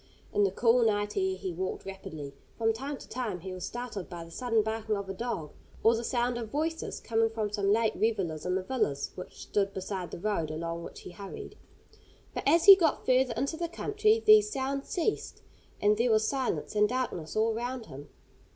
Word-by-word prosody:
In 205 - +3
the 195 - +4
cool 235 +5 +3
night 205 -2 +1
air 380 -1 +1
he 185 - -4
walked 185 +2 -4
rapidly. 160 -7 -7 0.2
From 225 -1 +2
time 275 +5 -5
to - - -12
time 220 -8 -3
he 190 +1 -6
was 185 -1 -5
startled 240 -6 -5
by 175 -2 -6
the 165 - -14
sudden 225 +2 +1
barking 220 -1 -1
of 200 -1 -5
a 195 - -4
dog, 200 -8 -4 0.3
or 225 - +6
the 230 +1 -2
sound 240 0 0
of 225 -2 -5
voices 320 +5 -2
coming 225 -1 +1
from 220 -2 -2
some 200 -1 +1
late 225 +1 +2
revellers 190 -9 0
in 180 - 0
the 190 - -1
villas 185 - -1
which 180 - -9
stood 200 -1 0
beside 190 -1 -4
the - - -7
road 175 -4 -1
along 165 +2 -4
which - - -9
he - - -9
hurried. 195 +2 -8 0.8
But - - -3
as 330 +3 +5
he 395 - +13
got 330 -5 +1
further 255 -2 +3
into 275 +6 -1
the 340 0 -2
country 425 +5 +2
these 425 0 +7
sounds 275 -1 -2
ceased, 375 +4 -2 0.4
and 210 +1 +4
there 240 +2 +2
was 220 -1 +3
silence 255 - -1
and 210 0 +3
darkness 240 -11 -3
all 220 +1 +2
round 245 +1 -4
him. 145 -3 -10
220 Hz, 205 wpm, -30 LUFS, 190-255 Hz, 0.8 s, he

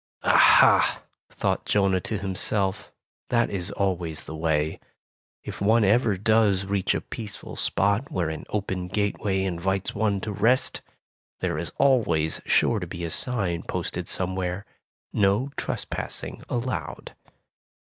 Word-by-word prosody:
''Aha!" - - +5 0.3
thought - - -1
Jonah 95 -2 +2
to 110 - -3
himself, 95 0 -1 0.4
"that 120 -1 +2
is 95 -2 -2
always 90 -6 -2
the 80 - -7
way. 80 -1 0 0.6
If - - -8
one 110 +3 +4
ever 105 0 +3
does 105 -2 +2
reach 100 -1 0
a - - -2
peaceful 105 -3 -8
spot 100 +7 0
where 85 -3 -1
an 80 - -7
open 95 -3 -3
gateway 100 0 -1
invites 95 +1 -1
one 105 -2 0
to 105 - -4
rest, 115 +6 +1 0.6
there 75 - -1
is 85 - -4
always 85 - +2
sure 115 - +3
to 90 - -5
be 85 0 -7
a 80 - -4
sign 95 -9 0
posted - - -4
somewhere, 95 +1 -1 0.5
'No 105 +7 +2
tres - - -3
passing - - -3
allowed. 125 +1 -4
100 Hz, 135 wpm, -25 LUFS, 90-105 Hz, 0.6 s, Aha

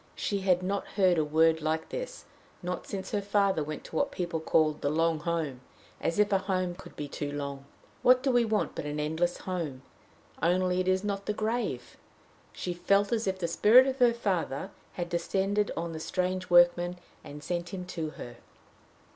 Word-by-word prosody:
She 200 - -1
had 185 -2 +2
not 200 +2 -2
heard 185 -4 +4
a - - +3
word 160 +2 +3
like 160 +1 -1
this - - -6 0.4
not 180 +1 -4
since 195 -1 -5
her 205 - 0
father 200 -4 +2
went 155 0 -6
to - - -10
what - - +1
people 170 -2 -2
call 155 -1 +3
the 145 - -2
"long 165 +1 +1
home" 155 -6 -2 0.4
as 165 - -1
if 210 0 +3
a 195 - +4
home 185 -2 -1
could 180 - -13
be 145 - -5
too 145 0 -4
long! 140 -1 -5 0.4
What 255 +1 +5
do 270 - +2
we 245 -1 +4
want 220 -2 0
but - - -5
an 150 +1 -3
endless 160 +4 0
home? 160 -8 -4 0.6
only 180 +2 +2
it 185 - -1
is 185 +1 +2
not 200 -1 -3
the 210 - +1
grave! 215 - -2 0.5
She 180 - -4
felt 200 +3 +2
as 225 -2 0
if 190 0 0
the 175 -2 -2
spirit 220 +9 +6
of 270 0 -2
her 245 -1 +6
father 190 - -2 0.2
had 175 -1 -3
descended 195 +4 0
on 170 0 -2
the 160 - -5
strange 185 +2 -2
workman, 175 0 +5 0.3
and 145 - -10
had 150 - -10
sent 175 -1 -3
him 185 -2 -5
to 170 -4 -4
her. 120 - -8
180 Hz, 195 wpm, -29 LUFS, 160-200 Hz, 0.6 s, spirit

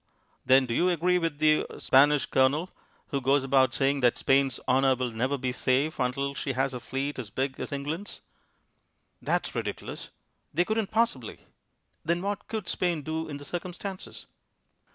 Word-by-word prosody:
"Then 130 0 +5
do 120 - -3
you 180 +8 +2
agree 180 +1 +2
with 165 -3 -2
the 155 0 +4
er - - -10
Spanish 145 +2 +4
Colonel, 145 +7 +2 0.4
who 140 - -1
goes 135 +2 +3
about 135 -1 +3
saying 140 +1 +2
that 125 -2 +3
Spain's 135 -1 +2
honour 130 +1 +4
will 125 -1 -2
never 130 +5 -1
be 125 -1 -2
safe 130 +5 0
until 140 +2 -1
she 135 0 -3
has 135 +1 0
a 125 - -4
fleet 135 +3 -4
as 115 -5 -6
big 135 +4 -3
as - - -5
England's?" 150 +8 -5 1.0
"That's - - -1
ridiculous. - - -5 0.5
They 175 - +3
couldn't 220 -1 -1
possibly." 220 - -1 0.6
"Then 170 +2 0
what 200 0 -3
could 220 -4 -4
Spain 175 -4 -1
do 160 +1 -3
in 145 - -5
the 145 - -10
circumstances?" 180 +4 -6
140 Hz, 170 wpm, -27 LUFS, 130-170 Hz, 1.0 s, Then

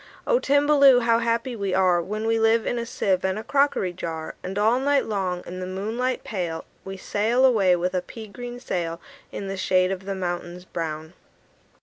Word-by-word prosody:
"O - - +3
Timballoo! 285 - +5
How 230 -1 +3
happy 235 +2 -1
we 200 -3 -2
are 180 -2 +3
When 210 +5 -4
we 225 0 +2
live 225 0 +3
in 245 - -1
a 235 - -4
sieve 190 -4 0
and 190 +1 0
a 215 - -5
crockery 275 -11 +1
jar! 165 -3 -5
And 190 +2 -5
all 220 +4 +3
night 280 +1 +2
long, 185 -4 -2
in 185 +1 -7
the 185 - -4
moonlight 220 +7 -2
pale, 175 -6 -4 0.2
We 195 0 -7
sail 225 +7 +1
away 200 -8 +4
with 180 +1 -1
a 180 - 0
pea 225 +4 -10
green 245 +3 -8
sail 170 -7 -3 0.3
In 200 - -5
the 195 - -3
shade 185 0 +2
of 190 0 -5
the 195 0 -3
mountains 175 -1 -4
brown." 160 -1 -5
195 Hz, 200 wpm, -24 LUFS, 180-235 Hz, 0.3 s, Timballoo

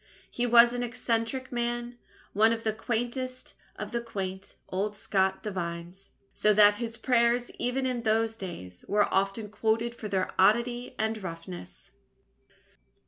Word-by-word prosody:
He 245 0 0
was 235 0 +7
an 245 - -2
eccentric 240 +1 -1
man, 240 0 -2 0.3
one 220 +3 +5
of 225 0 -4
the 220 - +1
quaintest 245 +3 -3 0.2
of - - -6
the 235 -1 -1
quaint 195 -4 -5
old 205 +3 -2
Scot 190 -2 0
divines, 175 -1 -5 0.2
so 210 -1 +3
that 205 0 +7
his 230 -1 -4
prayers, 240 0 +2
even 255 +2 0
in 250 -2 -1
those 225 0 +1
days, 130 - -8
were 205 0 +3
often 195 +3 0
quoted 225 +2 0
for 225 -2 -7
their 190 -2 -1
oddity 235 +5 +2
and 220 0 -1
roughness. 170 - -8
225 Hz, 140 wpm, -28 LUFS, 195-240 Hz, 0.3 s, was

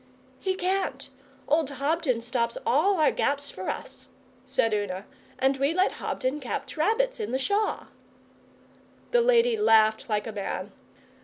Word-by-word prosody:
'He 380 -1 -1
can't. 380 +1 -2 0.4
Old 305 -1 +2
Hobden 280 -3 0
stops 235 -1 -1
all 345 +8 +3
our 310 - +4
gaps 285 0 -1
for 185 - -5
us,' - - -6 0.4
said 225 - +1
Una, 205 -2 -2 0.3
'and 270 +1 +2
we 280 +4 +1
let 370 +1 +3
Hobden 260 +3 -3
catch 265 0 -5
rabbits 460 +10 +1
in 430 - -3
the 260 - +1
Shaw.' 405 +10 0 1.3
The 485 -1 +4
lady 475 -1 +4
laughed 220 - +4
like 210 -1 0
a 225 - -4
man. 200 -1 -4
280 Hz, 145 wpm, -27 LUFS, 235-380 Hz, 1.3 s, our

